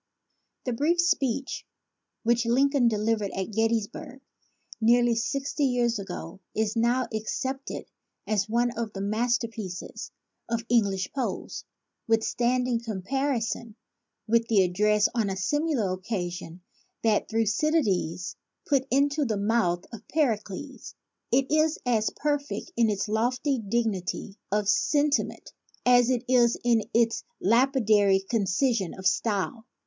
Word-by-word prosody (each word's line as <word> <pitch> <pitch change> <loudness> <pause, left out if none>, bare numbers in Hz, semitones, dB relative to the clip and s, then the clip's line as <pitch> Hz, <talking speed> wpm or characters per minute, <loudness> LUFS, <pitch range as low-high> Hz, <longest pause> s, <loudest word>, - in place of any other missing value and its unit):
The 250 - -1
brief 315 +8 +1
speech 275 -7 0 0.6
which 235 0 +2
Lincoln 270 +1 +3
delivered 215 -1 0
at 190 +2 -3
Gettysburg 225 +4 -1 0.6
nearly 240 +1 +4
sixty 275 +6 -1
years 240 -3 +1
ago 180 -2 -7 0.2
is 220 +1 0
now 240 +2 +2
ac 220 -1 -3
cepted 265 +4 -4 0.4
as 215 -1 0
one 240 +2 +2
of 225 -3 -4
the 195 - -5
masterpieces 220 -1 -2 0.4
of 230 0 -1
English 200 -5 +1
prose, 270 - -4 0.4
withstanding 240 +2 +1
comparison 230 +1 -2 0.5
with 230 +1 +2
the 205 -4 +4
ad 180 -1 -1
dress 210 +2 +3
on 225 -4 0
a 190 - -3
similar 265 - 0
occasion 180 -3 -5 0.4
that 220 -2 +2
Thucydides 215 - 0 0.3
put 275 -2 +1
into 285 +3 +2
the 220 -6 -1
mouth 200 -4 +1
of 230 -1 -10
Pericles. 255 -2 -2 0.4
It 265 +3 +2
is 310 +1 +3
as 225 -3 +2
perfect 290 +3 -2
in 230 -2 +3
its 205 0 -1
lofty 250 +5 0
dignity 210 -2 -2
of 210 0 +1
sentiment 290 +7 +1 0.3
as 245 -1 +5
it 250 -2 +1
is 240 -2 +4
in 230 -3 +3
its 230 0 +2 0.2
lapi 255 +6 +3
dary 200 -2 +5
concision 200 0 0
of 190 - -10
style. 220 +4 0
230 Hz, 125 wpm, -27 LUFS, 205-255 Hz, 0.6 s, as